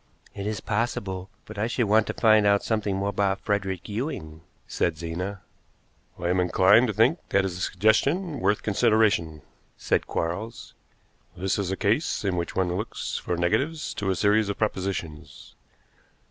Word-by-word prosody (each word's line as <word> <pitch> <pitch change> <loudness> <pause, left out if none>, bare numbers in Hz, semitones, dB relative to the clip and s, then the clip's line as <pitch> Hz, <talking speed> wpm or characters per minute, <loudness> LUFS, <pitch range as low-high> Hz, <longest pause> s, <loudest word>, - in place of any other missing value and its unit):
"It 100 +1 -5
is 105 -2 -3
possible, 100 -4 -2 0.2
but 110 -1 -9
I 110 - +1
should 120 0 0
want 110 +1 +3
to - - -2
find 110 -2 +5
out 100 0 +3
something 105 -3 -1
more 100 +1 -1
about 100 -1 0
Frederick 95 -3 -2
Ewing," 100 - -5 0.3
said 85 -3 -1
Zena. 90 +4 -5 0.8
"I 85 - -2
am 90 +1 +2
inclined 95 +6 +5
to 110 - -2
think 115 - +3
that 100 0 +2
is 95 -2 -3
a 90 - -6
suggestion 140 - +1
worth 100 +2 +1
consideration," 105 -8 +2 0.3
said - - 0
Quarles. 100 +8 -4 0.6
"This 95 +2 -1
is 100 -3 -1
a 95 - -2
case 110 +2 0
in 95 -2 +1
which 85 -1 -3
one 90 -2 +1
looks 105 +4 -4
for 90 - -3
negatives 140 - 0
to 95 - -3
a 95 - +1
series 105 +3 +2
of 100 - -3
propositions. 95 -7 -4
100 Hz, 165 wpm, -26 LUFS, 90-110 Hz, 0.8 s, find